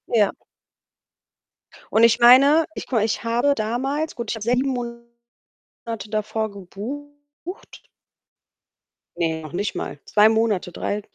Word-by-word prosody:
Ja. 215 -4 +3 1.6
Und 220 - +4
ich 230 0 +5
meine, 275 +6 +7
ich - - -7
gucke 260 - -4
mal, 220 - +3
ich 225 +1 -3
habe 240 +5 +2
damals 270 +7 -2
gut, 235 -2 -4
ich - - -3
habe 215 - -7
7 250 +4 +1
Monate 235 -1 -8 0.6
davor 215 0 -2
gebucht. 290 - -10 1.3
Ne, 160 -1 -1
noch 155 -2 -10
nicht 200 +4 -2
mal. 145 - -5
2 210 +1 +5
Monate, 220 -5 0
3, 205 +4 -3
235 Hz, 130 wpm, -22 LUFS, 210-265 Hz, 1.6 s, meine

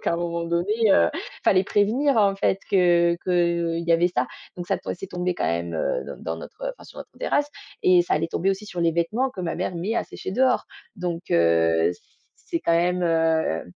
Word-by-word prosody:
donc - - -16
à 170 - +2
un - - -2
moment 170 0 -2
donné, 170 +4 0 0.2
heu, 85 - +5
il - - -8
fallait 185 0 +4
prévenir, 235 +8 +2
en 200 -3 +4
fait, 195 - +1
que 175 -2 +4
qu'il 170 -2 0
y 170 - +3
avait 170 +1 +3
ça, 130 -8 -1 0.3
donc 175 - -6
ça - - 0
to - - -7
c'est 195 - -8
tombé 180 0 -2
quand - - -2
même, 85 0 -2
heu, 80 - -1
dans - - -8
dans 80 - -2
notre 80 - -11
enfin, - - -16
sur - - -13
notre - - -9
terrasse 290 -12 0 0.3
et 180 -1 +5
ça 175 - 0
allait 165 +2 -1
tomber 190 +4 0
aussi 195 +2 -3
sur 180 -4 -5
les 165 -1 +2
vêtements 215 +11 0
que 190 - -8
ma 175 -2 -2
mère 185 0 -3
met 185 +7 -2
à - - 0
sécher - - -7
dehors, 255 +5 +2 0.3
donc 175 -2 -3
heu, 85 0 +3 0.6
c'est 335 -2 -1
quand 170 - +1
même, 180 +1 +1
heu 160 - +1
175 Hz, 225 wpm, -24 LUFS, 165-190 Hz, 0.6 s, heu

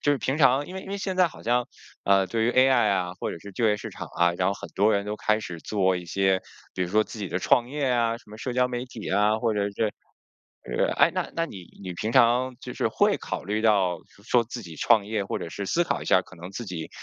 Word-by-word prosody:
就 145 - +3
是 140 - 0
平 135 +3 -1
常 135 0 +4
因 185 - -9
为 190 - -5
因 - - -11
为 200 - -2
现 190 -1 -3
在 185 - +5
好 - - -14
像， 120 +1 +1 0.4
呃， 100 -1 +4
对 115 +2 0
于 120 - +3
AI 130 -3 +5
啊， 90 -2 -1
或 - - -4
者 - - -6
是 100 - -10
就 115 +3 +1
业 105 - +3
市 105 - -7
场 - - -7
啊， 85 0 +4
然 90 +1 0
后 100 - 0
很 - - -9
多 105 +3 +3
人 100 0 0
都 105 +1 -4
开 105 +1 +1
始 90 -5 -6
做 95 0 +1
一 90 - -6
些， 95 +1 +1 0.3
比 90 - -1
如 90 - -2
说 110 +1 +4
自 110 - -10
己 100 -3 -4
的 90 - -1
创 120 +4 +3
业 145 0 -2
啊， 115 -1 +1
什 105 - -20
么 110 - -10
社 125 - -3
交 125 0 +2
媒 125 0 -3
体 120 -6 -7
啊， 105 +2 +3
或 115 -2 +1
者 105 -1 0
是 - - -17 0.9
是 - - -6 0.2
诶， - - +5
那 - - -2
那 165 0 +1
你 95 - -9 0.2
你 90 -2 -5
平 110 +6 -3
常 125 +2 +4
就 - - -7
是 - - 0
会 - - +2
考 - - -5
虑 105 +3 -1
到 100 -6 +3 0.3
说 120 0 +3
自 120 +1 -7
己 85 -3 -10
创 110 +3 +3
业 105 -1 -1
或 - - -3
者 - - -5
是 100 +3 -5
思 175 - +2
考 - - -2
一 - - -7
下 90 - +4
可 95 - -16
能 90 +2 -9
自 115 +3 -6
己， 85 -4 -6
110 Hz, 305 characters per minute, -26 LUFS, 95-125 Hz, 0.9 s, 在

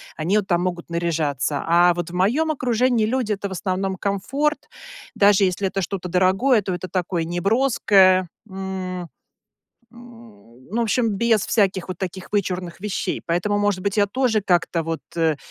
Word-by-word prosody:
Они 175 +7 0
от 200 -2 -1
там 175 -2 +1
могут 175 -2 -4
наряжаться. 155 -5 -1
А 175 +1 +5
вот 175 -1 -4
в - - -12
моем 250 - +2
окружении 245 -4 +1
люди- 230 -2 0
это 200 0 -4
в - - -12
основном 190 +1 -2
комфорт, 270 +11 -2 0.4
даже 200 -1 +4
если 190 +1 +1
это 195 +1 -2
что-то 180 0 -4
дорогое, 190 +7 +3
то 190 -1 -3
это 180 +1 -5
такое 175 -2 -2
неброское. 190 -1 +3 0.2
М 185 -2 -5 0.8
м 235 -1 -14 0.4
ну, 230 - -1
в - - +2
общем, 230 +1 +1
без 225 -2 +2
всяких 195 -5 +1
вот 185 - -6
таких 190 0 -6
вычурных 180 -4 -2
вещей. 205 0 -3
Поэтому, 190 +5 0
может 205 -3 0
быть, 200 +1 -1
я 205 0 +4
тоже 240 -1 +1
как-то 175 -3 +1
вот 165 0 -4
э 160 -2 +2
190 Hz, 165 wpm, -22 LUFS, 175-215 Hz, 0.8 s, А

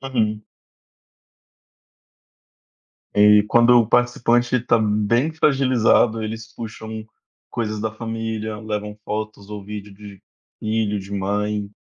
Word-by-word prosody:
Uhum. 110 -2 0 2.7
E 105 0 +6
quando 120 +2 +5
o 115 - +3
participante 120 +1 +2
tá 115 - +2
bem 110 +7 +1
fragilizado, 125 -6 +3
eles 110 0 -6
puxam 110 -1 -7 0.4
coisas 110 -2 -3
da 110 - -2
família, 110 -1 -4
levam 105 -1 -5
fotos 105 -1 -5
ou 105 -1 -6
vídeo 105 0 -8
de 100 -1 -13 0.4
filho, 110 -1 -1
de 95 +1 -10
mãe, 100 +1 -2
110 Hz, 105 wpm, -21 LUFS, 105-115 Hz, 2.7 s, E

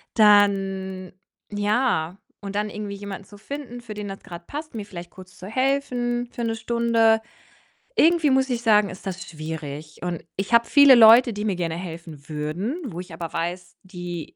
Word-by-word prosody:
Dann 195 -3 +3 0.4
ja 205 -4 0 0.2
und 200 0 -7
dann 210 0 -1
irgendwie 205 -1 -5
jemanden 200 -1 -8
zu 205 - -14
finden, 245 +1 -7
für 225 -3 -8
den 210 -1 -5
das 195 - -8
grad 170 0 -10
passt, 300 0 -7
mir 210 -2 -5
vielleicht 175 -3 -9
kurz 185 -1 -14
zu 185 - -10
helfen 245 -1 -1
für 240 - -6
'ne 225 -1 -1
Stunde. 230 -1 +2 0.7
Irgendwie 330 -4 +4
muss 265 0 +2
ich 240 -1 -1
sagen, 210 -3 +4
ist 185 +3 -11
das 185 -1 -5
schwierig 155 -1 -7
und 175 -2 -3
ich 200 +4 -3
habe 235 0 +6
viele 285 -2 +8
Leute, 230 +1 +8
die 210 +1 -4
mir 200 -4 0
gerne 165 -2 -2
helfen 165 -4 -9
würden, 165 - -3
wo 180 -7 -6
ich 180 -2 -12
aber 165 0 -6
weiß, 175 +2 -4
die 175 -3 -7
205 Hz, 180 wpm, -24 LUFS, 175-235 Hz, 0.7 s, viele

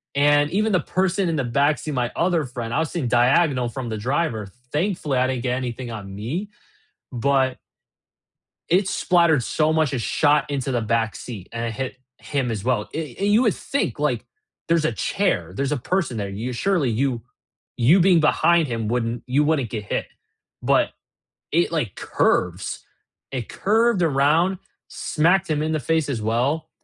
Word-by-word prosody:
and 145 +1 +4
even 215 +3 +1
the 185 - +3
person 185 +3 0
in 165 - 0
the 140 - 0
backseat, 140 +5 0
my 125 -2 0
other 170 -3 +1
friend 120 -2 -5
I - - +1
was 160 -2 -1
sitting 150 -9 -2
diagonal 125 +2 +3
from 120 0 -5
the 110 - -3
driver, 120 -2 -1 0.2
thankfully, 155 -4 -1
I 130 +1 +3
didn't 130 -2 -2
get 125 -1 0
anything 125 -1 -5
on 100 -3 -7
me, 150 - -4 0.6
but 130 +1 +1 1.1
it 185 +3 +3
splattered 170 -7 +3
so 155 +6 +1
much 155 -3 +2
and 125 - -1
shot 150 +5 +2
into 135 -2 -2
the 120 -2 0
backseat, 110 -2 -2
and 115 0 -3
it 115 - -2
hit 130 +3 -4 0.2
him 135 -4 -2
as 105 -3 -4
well, 120 -4 0
a 150 -6 -5
and 200 - 0
you 220 - +5
would 220 -7 +2
think, 280 - -2
like, - - 0 0.4
there's 165 -2 +2
a - - +2
chair, 200 0 -1
there's 140 +1 -1
a 150 - +1
person 170 -1 -1
there, 100 -2 -3
you 110 +6 -4
surely 175 +3 +1
you 120 0 -1 0.5
you 135 +11 +5
being 180 -1 +5
behind 165 +1 +3
him 115 -3 -3
wouldn't 115 0 -1
you 135 +4 +2
wouldn't 145 -7 0
get 110 -3 -4
hit, - - -2 0.6
but - - +3 0.6
it, 170 +2 +2
like, 150 - -2
curves 90 +1 0 0.5
it 125 -4 -4
curved 220 0 +2
around, 160 +5 +3 0.3
smacked 175 +5 +1
him 150 -1 0
in 155 +1 -1
the 155 - 0
face 160 +3 +1
as 120 -6 -2
well, 125 +9 0
140 Hz, 175 wpm, -23 LUFS, 120-165 Hz, 1.1 s, you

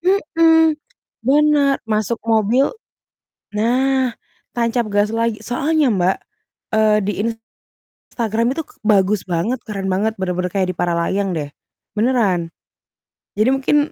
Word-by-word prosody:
Mhm, 330 -3 +3 0.5
bener, 290 0 +4
masuk 220 +1 -1
mobil 225 +4 +2 0.8
nah 255 +3 +1 0.4
tancap 235 -1 0
gas 205 +1 +1
lagi, 230 -1 0
soalnya 285 +2 +1
Mbak, 185 -1 +1 0.6
eee, 215 -1 +4
di 205 - -1 0.8
Instagram 230 +1 -2
itu 325 - -3
k - - -19
bagus 205 -1 +2
banget, 180 +8 -1
keren 195 -3 -4
banget 210 +4 0
bener-bener 180 -1 -2
kayak 190 -2 0
di 180 - -3
Paralayang 175 +3 0
deh 150 -3 -3 0.5
beneran. 205 -8 +1 0.8
Jadi 215 +5 +2
mungkin 270 +2 +2
220 Hz, 115 wpm, -19 LUFS, 195-260 Hz, 0.8 s, bener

